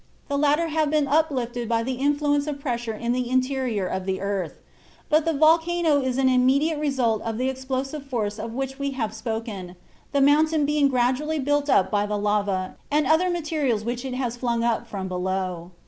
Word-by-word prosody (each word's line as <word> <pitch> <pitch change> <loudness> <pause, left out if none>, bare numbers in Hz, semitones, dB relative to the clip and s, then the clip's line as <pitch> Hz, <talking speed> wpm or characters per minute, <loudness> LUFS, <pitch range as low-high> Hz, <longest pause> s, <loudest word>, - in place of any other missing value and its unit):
The 285 - 0
latter 300 +3 +2
have 310 -1 +1
been 300 -1 +2
uplifted 255 -6 0
by 230 -1 +1
the 260 +2 -2
influence 290 +2 +1
of 290 -2 -3
pressure 240 -5 -3
in 235 +2 -2
the 250 0 -1
interior 255 -5 0
of 190 +1 -3
the 190 0 -1
earth, 195 -3 -3 0.5
but 310 +1 +3
the 330 - +1
volcano 320 0 +3
is 260 -1 -1
an 265 -1 +3
immediate 270 +5 +3
result 255 -7 0
of 225 -1 -3
the 255 +2 0
explosive 265 +2 -4
force 215 -5 -2
of 225 +1 -5
which 270 +2 -4
we 280 0 -2
have 220 -4 -2
spoken, 220 -5 -5 0.4
the 280 - +1
mountain 300 +2 +4
being 295 -1 +3
gradually 260 +4 +1
built 290 +1 0
up 190 - +3
by 205 -1 +1
the 210 0 -1
lava 205 -2 -1
and 295 0 +2
other 320 +6 +3
materials 305 -10 -1
which 240 +1 -3
it 260 -2 -4
has 245 -2 -2
flung 235 -2 -1
up 235 0 0
from 195 -4 -5
below. 185 -1 -3
260 Hz, 195 wpm, -24 LUFS, 225-290 Hz, 0.5 s, mountain